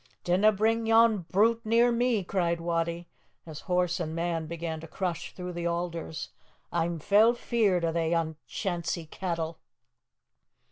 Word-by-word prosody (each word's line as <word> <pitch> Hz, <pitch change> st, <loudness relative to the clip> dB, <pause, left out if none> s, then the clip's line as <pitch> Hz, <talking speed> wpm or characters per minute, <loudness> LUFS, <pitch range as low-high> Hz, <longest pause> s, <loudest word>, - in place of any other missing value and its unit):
"Dinna 190 Hz, +5 st, +4 dB
bring 220 Hz, +2 st, +1 dB
yon 225 Hz, -1 st, +5 dB
brute 225 Hz, +4 st, +3 dB
near 235 Hz, +2 st, +4 dB
me!" 235 Hz, -3 st, +1 dB
cried 170 Hz, -2 st, 0 dB
Wattie, 170 Hz, 0 st, -2 dB, 0.4 s
as 155 Hz, -2 st, -8 dB
horse 180 Hz, 0 st, +1 dB
and 160 Hz, -2 st, -3 dB
man 165 Hz, -1 st, -2 dB
began 165 Hz, -1 st, -4 dB
to 165 Hz, -, -9 dB
crush 175 Hz, -1 st, -4 dB
through 180 Hz, -1 st, -6 dB
the 170 Hz, 0 st, -2 dB
alders. 170 Hz, -2 st, -3 dB, 0.4 s
"A'm 170 Hz, 0 st, 0 dB
fell 205 Hz, +8 st, +4 dB
feared 210 Hz, -8 st, +1 dB
o' 165 Hz, -, +1 dB
they 165 Hz, 0 st, 0 dB
unchancy 165 Hz, +1 st, -3 dB
cattle." 165 Hz, -1 st, -4 dB
175 Hz, 140 wpm, -28 LUFS, 165-210 Hz, 0.4 s, yon